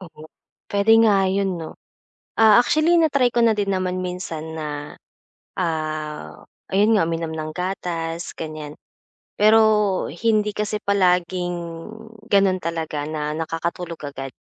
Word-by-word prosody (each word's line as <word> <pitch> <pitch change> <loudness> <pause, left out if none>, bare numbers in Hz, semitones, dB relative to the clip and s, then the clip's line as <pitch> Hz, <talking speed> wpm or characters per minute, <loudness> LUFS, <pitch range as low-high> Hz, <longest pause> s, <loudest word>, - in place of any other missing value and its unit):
Oo, 165 -4 -13 0.5
puwede 205 +2 +4
nga 195 -3 +3
'yon, 190 -2 -1
'no. 160 - -8 0.6
Ah, 220 -1 +7
actually 310 +6 +3
na-try 280 -6 +3
ko 240 0 +1
na 225 - +4
din 200 -1 0
naman 185 0 -1
minsan 165 -3 -5
na, 150 -1 -6 0.6
ah, 155 - -4 0.3
ayun 210 +3 +4
nga, 180 - +3
uminom 165 -1 -3
ng 155 -1 -5
gatas, 175 -2 -3
ganiyan. 155 -2 -7 0.6
Pero 210 -2 +4
hindi 210 +3 +1
kasi 210 0 -2
palaging 180 -2 +1 0.7
gano'n 195 -2 +3
talaga 160 -3 -3
na 150 -1 -3
nakakatulog 165 +2 -4
agad. 135 -1 -6
180 Hz, 125 wpm, -22 LUFS, 160-205 Hz, 0.7 s, Ah